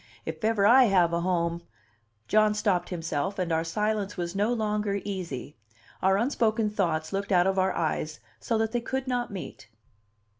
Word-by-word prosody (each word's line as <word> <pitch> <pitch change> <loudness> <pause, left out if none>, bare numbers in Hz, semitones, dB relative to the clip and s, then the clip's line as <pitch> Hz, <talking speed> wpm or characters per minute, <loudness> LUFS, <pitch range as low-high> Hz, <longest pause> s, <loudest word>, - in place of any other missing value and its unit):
If - - -6
ever 215 -2 +2
I 250 +4 +7
have 180 -5 +3
a 170 - +1
home 170 -1 0 0.3
" 105 -1 -43
John 215 0 +3
stopped 190 -4 0
himself, 170 +2 -3
and 180 -3 -1
our 160 0 +1
silence 205 +3 -2
was 175 +1 -3
no 205 +4 +1
longer 210 -3 -1
easy; 175 -9 -5 0.4
our 190 +1 +3
unspoken 225 -2 +1
thoughts 165 -5 -1
looked 200 +2 -2
out 180 -2 +4
of 190 0 +1
our 185 0 +2
eyes 155 -1 -2 0.2
so 230 - -1
that 220 0 0
they 240 0 -1
could 265 +2 -3
not 245 -1 -1
meet. 185 - -8
195 Hz, 180 wpm, -27 LUFS, 170-215 Hz, 0.4 s, I